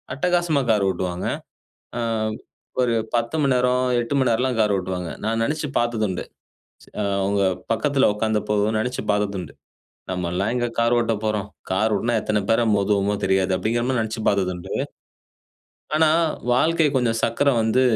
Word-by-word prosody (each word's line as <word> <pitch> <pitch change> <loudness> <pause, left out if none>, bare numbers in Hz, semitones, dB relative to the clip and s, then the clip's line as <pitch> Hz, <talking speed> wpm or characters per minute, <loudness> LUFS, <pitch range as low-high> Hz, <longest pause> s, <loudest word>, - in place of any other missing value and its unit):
அட்டகாசமா 175 -3 +1
கார் 105 -2 +2
ஓட்டுவாங்க. 90 -1 -2 0.7
அ - - -1 0.8
ஒரு 120 -2 +2 0.2
10 115 +5 0
மணி 135 - +3
நேரம் 125 +1 +2
8 120 +4 -3
மணி 130 -2 +2
நேரம்லாம் 125 +1 +1
கார் 105 -2 +3
ஓட்டுவாங்க. 90 -2 -4
நான் 115 +1 0
நெனைச்சு 150 +2 -2
பார்த்ததுண்டு 110 -6 -1 0.6
ச - - -20 0.2
ஆவங்க 100 0 0 0.3
பக்கத்துல 135 +4 +2
உட்கார்ந்த 110 0 0
போதும் 105 +1 +1
நெனைச்சு 125 +3 -2
பார்த்ததுண்டு. 100 -5 -2 0.6
நம்மல்லாம் 90 +4 -1
எங்க 120 -1 0
கார் 115 +1 +3
ஓட்ட 115 -1 +1
போறோம். 105 -2 -1 0.2
கார் 105 +4 +1
ஓட்டுனா 120 +4 0
எத்தன 105 -1 0
பேர 115 +1 +3
மோதுவோமோ 100 0 +1
தெரியாது. 95 0 +2
அப்படிங்கிற 115 +4 0
மாரி 130 -2 +1
நெனைச்சுப் 110 0 -3
பார்த்ததுண்டு. 90 -3 -1 1.2
ஆனா 160 0 +5 0.4
வாழ்க்கை 160 +5 +3
கொஞ்சம் 115 -3 +1
சக்கரம் 140 +1 +2
வந்து 115 +4 +2
110 Hz, 145 wpm, -23 LUFS, 100-125 Hz, 1.2 s, ஆனா